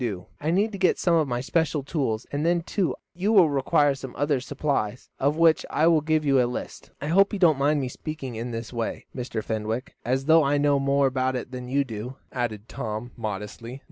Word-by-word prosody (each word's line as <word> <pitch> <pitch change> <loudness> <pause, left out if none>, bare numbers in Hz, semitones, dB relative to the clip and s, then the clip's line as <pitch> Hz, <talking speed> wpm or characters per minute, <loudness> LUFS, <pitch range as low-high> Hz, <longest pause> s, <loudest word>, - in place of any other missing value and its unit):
I 150 - -2
need 200 +6 +2
to 200 - -7
get 185 - +3
some 175 - +2
of 160 -3 +3
my 120 -1 -2
special 155 +1 0
tools, 135 -7 -2
and 145 +1 -1
then, 170 0 +2
too, 185 0 -1 0.2
you 190 +5 0
will 185 -8 +6
require 140 +1 +3
some 130 -2 -8
other 145 0 +1
supplies, 130 -4 -2
of 145 +3 +1
which 165 -1 +4
I 155 - +2
will 165 -2 +5
give 155 0 +1
you 135 -2 +4
a 120 - +1
list. 125 - -6
I - - -5
hope 195 +7 +4
you - - 0
don't 165 -7 +4
mind 145 +2 +2
me 130 - -1
speaking 135 -1 -6
in 115 +2 -4
this 115 0 -6
way, 115 -2 -3
Mr. 120 -4 -4
Fenwick, 110 +4 -3
as 130 +3 0
though 160 +2 +6
I 140 +1 +2
knew 145 -1 +3
more 140 0 +2
about 130 0 0
it 125 0 -5
than 125 -1 -6
you 140 +3 +1
do," 120 +1 -6 0.2
added 115 -4 -3
Tom, 115 -2 -5
modestly. 110 +3 -6
140 Hz, 220 wpm, -25 LUFS, 120-155 Hz, 0.2 s, will